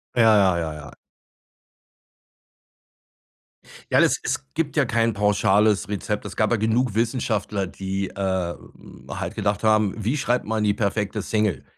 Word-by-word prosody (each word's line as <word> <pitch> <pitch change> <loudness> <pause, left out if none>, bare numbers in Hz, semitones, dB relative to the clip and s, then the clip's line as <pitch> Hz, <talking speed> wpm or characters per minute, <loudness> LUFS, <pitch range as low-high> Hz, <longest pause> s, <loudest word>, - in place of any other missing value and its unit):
Ja, 120 - +4
ja, 95 -3 +3
ja, 80 -2 -3
ja. 75 -2 -10 3.0
Ja, - - +5
es - - +3
es 65 - -3
gibt - - -2
ja - - +3
kein 115 0 +1
pauschales 105 0 +2
Rezept. 105 +1 -3
Es 100 -3 -7
gab 110 - +1
ja 120 - +3
genug 110 +2 +1
Wissenschaftler, 110 -3 -1
die, 95 +1 -4
äh, 95 -3 -2
hm, - - -16
halt - - -4
gedacht 100 0 -1
haben: 110 -2 +3
„Wie 115 +5 -1
schreibt 125 -4 0
man 110 0 -1
die 105 -1 +2
perfekte 105 -1 -1
Single?“ 105 -4 0
105 Hz, 150 wpm, -23 LUFS, 95-110 Hz, 3.0 s, Ja